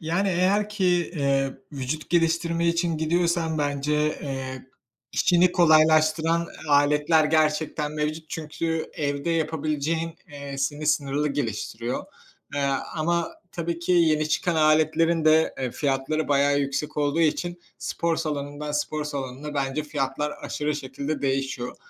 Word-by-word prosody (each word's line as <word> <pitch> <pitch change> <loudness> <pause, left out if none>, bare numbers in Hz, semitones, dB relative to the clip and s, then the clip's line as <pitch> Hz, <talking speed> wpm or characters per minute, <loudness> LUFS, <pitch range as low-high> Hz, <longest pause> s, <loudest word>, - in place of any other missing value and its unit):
Yani 170 +5 0
eğer 190 +4 +2
ki, 210 -2 -2 0.3
eee, 135 -2 +1 0.2
vücut 140 +3 -4
geliştirme 170 0 +1
için 170 -1 +1
gidiyorsan 165 0 +1
bence, 145 0 -1 0.3
eee, 130 -2 -5 0.5
işini 180 0 +4
kolaylaştıran 160 0 +4 0.2
aletler 150 +2 +4
gerçekten 150 -1 +1
mevcut. 155 +1 -3
Çünkü 160 +1 -3
evde 145 +1 -2
yapabileceğin, 160 0 -1
eee, 140 -1 -7
seni 145 +2 -2
sınırlı 145 0 +1
geliştiriyor. 120 -2 -3 0.5
Eee, 145 - 0 0.4
ama 170 +1 0 0.2
tabii 170 0 -3
ki, 175 +2 -1
yeni 155 -3 +3
çıkan 175 +2 0
aletlerin 155 +1 +3
de, 155 +1 +4
eee, 130 -2 -2
fiyatları 140 +3 -1
bayağı 140 0 +3
yüksek 140 +1 -2
olduğu 145 +2 +1
için 175 +2 0 0.2
spor 170 -1 -1
salonundan, 150 -1 -3
spor 150 +1 -1
salonuna 140 0 -5
bence 140 +1 -1
fiyatlar 145 0 -2
aşırı 150 0 -2
şekilde 140 +2 -4
değişiyor. 135 -2 -2
155 Hz, 125 wpm, -25 LUFS, 145-165 Hz, 0.5 s, işini